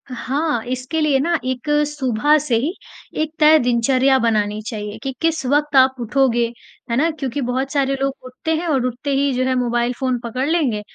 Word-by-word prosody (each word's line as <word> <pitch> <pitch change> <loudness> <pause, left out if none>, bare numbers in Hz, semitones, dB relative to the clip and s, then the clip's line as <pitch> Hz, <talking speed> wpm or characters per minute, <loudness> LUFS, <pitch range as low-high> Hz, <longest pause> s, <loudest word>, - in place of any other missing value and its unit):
हाँ, 275 -1 -1
इसके 255 +6 -3
लिए 295 -3 +2
ना 335 +4 +1
एक 255 +2 -3 0.2
सुबह 295 0 +1
से 275 -5 -1
ही 290 +10 -1 0.5
एक 310 -1 -2
तय 310 0 +7
दिनचर्या 255 +2 +2
बनानी 215 -3 0
चाहिए 210 -2 -5
कि 270 - -2
किस 325 -4 0
वक़्त 290 +2 +1
आप 260 0 +5
उठोगे, 240 0 +1 0.5
है - - +1
ना? 320 +5 +3
क्योंकि 280 -3 -4
बहुत 260 +2 -2
सारे 275 -2 +1
लोग 275 0 0
उठते 255 +6 -3
हैं 340 +2 -3
और 270 -6 +1
उठते 255 +3 -3
ही 280 +1 +1
जो 255 +1 0
है 260 0 +1
मोबाइल 240 -1 0
फ़ोन 255 -2 0
पकड़ 255 +4 -2
लेंगे 275 -11 +1
265 Hz, 190 wpm, -20 LUFS, 245-295 Hz, 0.5 s, तय